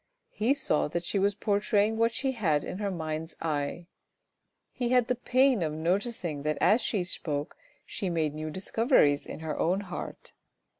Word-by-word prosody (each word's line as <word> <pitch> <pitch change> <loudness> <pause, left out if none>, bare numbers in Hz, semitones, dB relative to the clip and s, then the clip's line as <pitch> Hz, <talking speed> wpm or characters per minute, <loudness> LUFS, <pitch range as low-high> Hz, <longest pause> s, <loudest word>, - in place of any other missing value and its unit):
He 240 +6 +1
saw 155 - +1
that 170 +3 -3
she 200 - 0
was 200 +1 +2
portraying 205 +1 +1
what 230 +1 +2
she 270 -1 0
had 165 - +1
in 185 - -5
her 205 -1 -1
mind's 160 -2 -4
eye. 155 +1 -2 0.9
He 245 -2 -2
had 250 -1 +4
the 250 - +2
pain 255 -1 +3
of 155 -2 -1
noticing 170 - -1
that 155 +1 -1
as 225 +4 +4
she 200 -5 0
spoke 150 -5 -3 0.3
she 195 -6 -3
made 160 -3 0
new 155 +1 -4
discoveries 185 - +2
in - - -7
her 160 -1 -3
own 185 +4 +1
heart. 180 -3 -7
185 Hz, 170 wpm, -29 LUFS, 155-225 Hz, 0.9 s, had